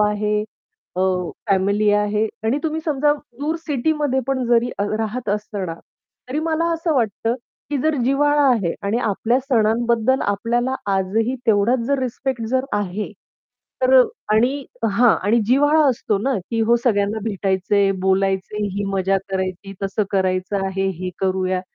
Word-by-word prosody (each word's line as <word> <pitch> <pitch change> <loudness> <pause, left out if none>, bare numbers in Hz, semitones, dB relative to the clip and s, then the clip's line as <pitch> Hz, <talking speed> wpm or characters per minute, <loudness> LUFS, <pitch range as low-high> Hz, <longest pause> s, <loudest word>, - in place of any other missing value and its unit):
आहे, 210 0 +1 0.6
अ, - - 0 0.5
फॅमिली 200 +2 +2
आहे 210 +1 +1 0.2
आणि 260 +6 +2
तुम्ही 320 -1 -1
समजा 295 -1 +2 0.3
दूर 305 +3 -1
सिटीमध्ये 290 -1 0
पण 265 -1 0
जरी 240 0 +3
अ, 200 - +1
राहत 225 +1 -3
असणार, 205 -4 -3 0.5
तरी 275 - -2
मला 330 +1 0
असं 330 -1 -1
वाटतं 230 -2 0 0.4
की 290 - 0
जर 315 0 +2
जिव्हाळा 290 +3 +3
आहे 195 -8 0
आणि 200 +4 0
आपल्या 225 +2 +1
सणांबद्दल 235 0 +2
आपल्याला 240 +5 0 0.2
आजही 220 +6 0
तेवढाच 225 +3 +3
जर 280 +1 +1
रिस्पेक्ट 255 -1 -3
जर 260 0 +1
आहे 205 +1 -3 0.7
तर - - +7 0.3
आणि 255 +6 +2 0.2
हां, 225 +3 +4
आणि 220 +5 +3
जिव्हाळा 290 +6 +4
असतो 225 -5 0
ना 265 +6 0 0.2
की 230 -1 0
हो, 230 +2 +4
सगळ्यांना 205 -2 +1
भेटायचंय, 195 -1 +1
बोलायचंय, 190 +2 0
ही 205 - -1
मजा 195 0 +1
करायची, 190 +1 -3
तसं 195 +2 0
करायचं 190 +1 0
आहे, 190 0 -1
हे 185 0 -3
करूया. 185 -1 0
220 Hz, 145 wpm, -21 LUFS, 200-260 Hz, 0.7 s, तर